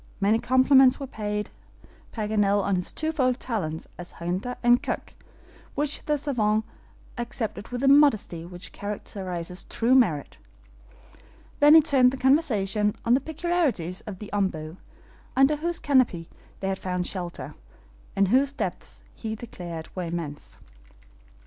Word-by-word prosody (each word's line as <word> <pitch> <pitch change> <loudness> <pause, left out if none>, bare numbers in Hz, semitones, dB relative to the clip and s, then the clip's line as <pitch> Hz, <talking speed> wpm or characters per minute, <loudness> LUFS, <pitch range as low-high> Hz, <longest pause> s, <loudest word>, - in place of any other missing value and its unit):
Many 205 +3 +3
compliments 260 +1 +5
were 275 - -4
paid 210 -4 -4 0.6
Paganel 210 -2 +1
on 200 0 +1
his 180 -1 -2
twofold 275 -5 0
talents 165 -10 -3
as 175 - -9
hunter 185 +8 -3
and 240 +1 +5
cook, - - -4 0.6
which 290 +1 -1
the 300 -1 +1
SAVANT 220 -7 0 0.6
accepted 225 -4 -4
with 245 0 -5
the 275 - +2
modesty 275 - +4
which 175 +1 -9
characterizes 185 -3 -5
true 240 +2 +1
merit. 175 - +2 1.2
Then 295 +2 +8
he 320 - +9
turned 270 -5 +4
the 265 - -5
conversation 215 - +2
on 235 - +4
the 265 - +3
peculiarities 305 - -1
of 200 -3 -6
the 210 +2 -9
OMBU, 170 -5 -2 0.6
under 270 +3 +4
whose 340 +3 -1
canopy 255 - +2 0.3
they 190 - -2
had 190 - -2
found 180 -1 -2
shelter, 175 -8 -5 0.6
and 195 -1 +3
whose 270 +4 +3
depths - - -5
he 220 -1 -5
declared 175 -8 -8
were 180 -2 -3
immense. 165 -3 -6
215 Hz, 135 wpm, -26 LUFS, 185-265 Hz, 1.2 s, he